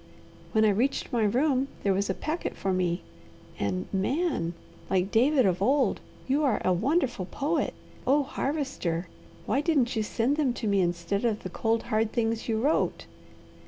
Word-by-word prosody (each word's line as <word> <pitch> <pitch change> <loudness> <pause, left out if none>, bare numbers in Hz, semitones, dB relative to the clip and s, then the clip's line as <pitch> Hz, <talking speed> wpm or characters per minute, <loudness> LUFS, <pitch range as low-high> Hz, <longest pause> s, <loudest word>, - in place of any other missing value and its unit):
When 220 -1 +4
I - - +5
reached 240 +8 0
my 230 -3 +2
room 260 +4 +2 0.2
there 195 - +3
was 200 +1 0
a 190 - 0
packet 315 +3 -3
for 190 - -1
me 180 -1 0 0.6
and, 95 -2 -1
Man, 200 - 0 0.3
like 190 +1 +1
David 260 +3 +4
of 185 -1 +1
old, 260 +1 +2 0.3
you 280 +3 +2
are 265 -6 +2
a 185 - +4
wonderful 245 - 0
poet! 305 +9 -1 0.3
Oh 285 +3 +4
Harvester! 265 - -2 0.4
why 275 - +1
didn't 285 -7 +2
you 220 - +1
send 235 +6 0
them 280 -5 +2
to 240 - -5
me 200 -2 +3
instead 175 +3 -1
of 220 -3 0
the 185 - -5
cold, 225 +3 0
hard 220 0 +1
things 230 -1 -1
you 220 -1 +1
wrote?" 290 +7 +1
225 Hz, 170 wpm, -28 LUFS, 190-275 Hz, 0.6 s, I